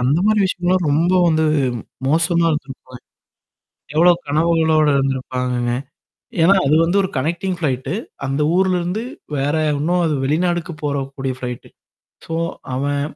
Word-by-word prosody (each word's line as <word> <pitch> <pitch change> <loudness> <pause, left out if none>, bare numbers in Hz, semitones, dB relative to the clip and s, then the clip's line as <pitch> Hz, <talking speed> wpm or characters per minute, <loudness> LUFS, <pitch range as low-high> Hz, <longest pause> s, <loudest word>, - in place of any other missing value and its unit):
அந்த 130 +5 +2
மாரி 215 0 +3
விஷயங்கள்லாம் 180 -1 0
ரொம்ப 165 +5 +2 0.2
வந்து 160 -1 +2 0.6
மோசமா 170 +3 +2
இருந்திருக்கன். 135 -4 -6 0.9
எவ்ளோ 170 +3 +6 0.2
கனவுகளோடு 160 0 +2
இருந்திருப்பாங்கங்க? 125 -2 -1 0.7
ஏன்னா, 185 +5 +6
அது 145 +2 +3
வந்து 175 +4 +1
ஒரு 190 - -2
கனெக்டிங் 175 +7 -1
ஃப்ளைட்டு. 135 -2 -2 0.3
அந்த 135 +2 -1
ஊர்லருந்து 185 +1 +1 0.4
வேற 145 +3 0 0.2
இன்னும் 175 +5 +1
அது 160 - 0
வெளிநாடுக்கு 170 +3 0
போறக்கூடிய 135 -2 -3
ஃப்ளைட்டு. 125 -1 -6 0.6
சோ 165 - -4 0.4
அவன் 140 +2 -1
155 Hz, 120 wpm, -19 LUFS, 135-175 Hz, 0.9 s, எவ்ளோ